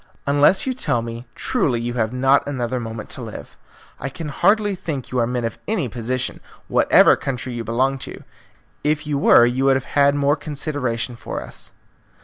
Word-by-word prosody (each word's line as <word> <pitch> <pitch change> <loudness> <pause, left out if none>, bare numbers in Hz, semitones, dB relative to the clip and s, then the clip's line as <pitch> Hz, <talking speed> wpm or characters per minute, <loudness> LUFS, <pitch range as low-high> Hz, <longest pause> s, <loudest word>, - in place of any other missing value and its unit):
Unless 145 +6 +4
you 260 - 0
tell 140 - 0
me 115 +1 -7
truly 120 -4 0
you 120 +1 -3
have 110 -2 0
not 135 +3 +3
another 125 -3 -2
moment 110 -2 -6
to - - -3
live. - - -9 0.4
I 140 - -3
can 150 +3 -6
hardly 205 +6 +2
think 160 -8 -5
you 130 - 0
are 115 - +2
men 125 -1 -2
of 115 - -4
any 200 -11 0
position, 125 +2 -3 0.3
whatever - - +5
country 125 -1 -4
you 120 -1 -4
belong 130 +4 0
to. - - -8 0.6
If 155 +1 0
you 145 -2 -1
were, 120 - +7
you 125 +3 0
would 135 -1 +5
have 130 - -6
had 140 0 +4
more 145 0 +2
consideration 140 -6 -3
for - - -6
us." - - -6
130 Hz, 185 wpm, -21 LUFS, 120-145 Hz, 0.6 s, were